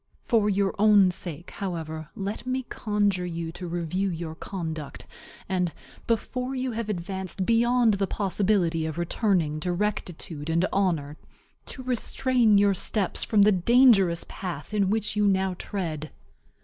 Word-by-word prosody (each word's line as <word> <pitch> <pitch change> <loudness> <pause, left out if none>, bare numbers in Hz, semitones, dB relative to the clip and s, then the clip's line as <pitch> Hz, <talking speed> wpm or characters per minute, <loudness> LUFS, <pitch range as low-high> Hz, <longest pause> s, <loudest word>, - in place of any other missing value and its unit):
For 220 -4 +2
your 200 -1 +1
own 205 -3 +6
sake, 170 -1 -4
however, 160 -4 -5
let 205 +5 -5
me 260 +1 -1
conjure 205 -4 0
you 165 -1 -4
to 175 +1 -7
review 175 +3 -1
your 165 -2 -5
conduct, 160 -4 -6 0.4
and, 180 -2 0 0.4
before 250 +3 -1
you 255 0 -2
have 225 -1 -4
advanced 190 0 -4
beyond 235 0 +3
the 195 -1 0
possibility 185 -5 +1
of 160 - -5
returning 175 -3 0
to 180 +3 -2
rectitude 175 -5 -3
and 170 +3 +2
honor, 165 -7 0 0.5
to 260 - -8
restrain 245 -2 +2
your 200 0 +4
steps 195 +1 +1
from 210 -2 +4
the 210 - +6
dangerous 195 -3 +4
path 180 -1 -6
in 200 -2 +2
which 215 0 0
you 210 -1 +3
now 190 -1 +1
tread. 155 -6 -4
190 Hz, 145 wpm, -26 LUFS, 170-210 Hz, 0.5 s, own